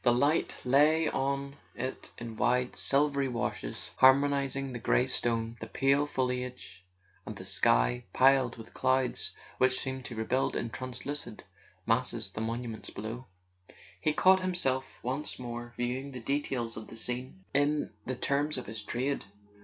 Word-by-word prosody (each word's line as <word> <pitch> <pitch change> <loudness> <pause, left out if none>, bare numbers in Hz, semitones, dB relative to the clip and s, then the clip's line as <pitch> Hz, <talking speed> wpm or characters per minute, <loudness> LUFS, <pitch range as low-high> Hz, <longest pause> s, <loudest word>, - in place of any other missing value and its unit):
The 120 - +5
light 145 +6 +2
lay 150 +5 +5
on 140 +1 -2 0.2
it 130 +2 -5
in 115 -1 -6
wide 125 +2 +1
silvery 140 0 +2
washes, 115 - -4
harmonizing 135 0 +4
the 120 - -4
grey 125 - +3
stone, 115 -2 0
the 115 - -6
pale 140 +4 +2
foliage, 125 -7 -3 0.4
and - - -8
a - - -8
sky - - +2
piled 130 -1 +4
with 115 -1 -11
clouds 130 -1 +1 0.2
which 130 0 +4
seemed 130 -1 -3
to 120 - -6
rebuild 110 +4 0
in 115 - -2
translucid 130 -1 -5 0.4
masses 115 -3 +2
the 110 - -5
monuments 115 0 -4
below. 115 +5 -6 0.7
He 155 - +2
caught 190 +5 +5
himself 175 -8 -1
once 135 +5 -2
more 120 -1 -6
viewing 130 +3 -2
the 125 - -6
details 125 -2 -2
of 110 - -7
the - - -10
scene 125 -4 -4
in 145 -3 +1
the 130 - -1
terms 145 +3 0
of 125 - -4
his 110 0 -5
trade. 130 +5 -2
130 Hz, 150 wpm, -30 LUFS, 120-140 Hz, 0.7 s, The